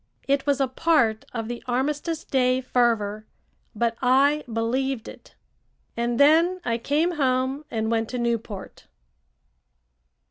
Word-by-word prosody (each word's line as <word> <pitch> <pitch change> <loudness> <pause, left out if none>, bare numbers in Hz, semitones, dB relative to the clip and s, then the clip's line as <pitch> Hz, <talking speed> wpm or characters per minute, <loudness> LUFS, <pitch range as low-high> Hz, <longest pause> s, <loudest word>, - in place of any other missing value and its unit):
It 275 +1 +1
was 285 -1 +2
a 270 - +2
part 255 -5 +1
of 225 -2 -4
the 240 0 -5
armistice 295 +6 -1
day 255 -1 +1
fervor, 225 -4 0 0.5
but 230 +1 0
I 275 +4 +3
believed 235 +2 -1
it. - - -13 0.6
And 235 0 -1
then 330 +6 +5
I 230 -1 0
came 310 +7 0
home 260 +1 0
and 220 -1 -2
went 225 -1 0
to 250 - -4
Newport. 230 -4 -4
255 Hz, 130 wpm, -24 LUFS, 230-285 Hz, 0.6 s, then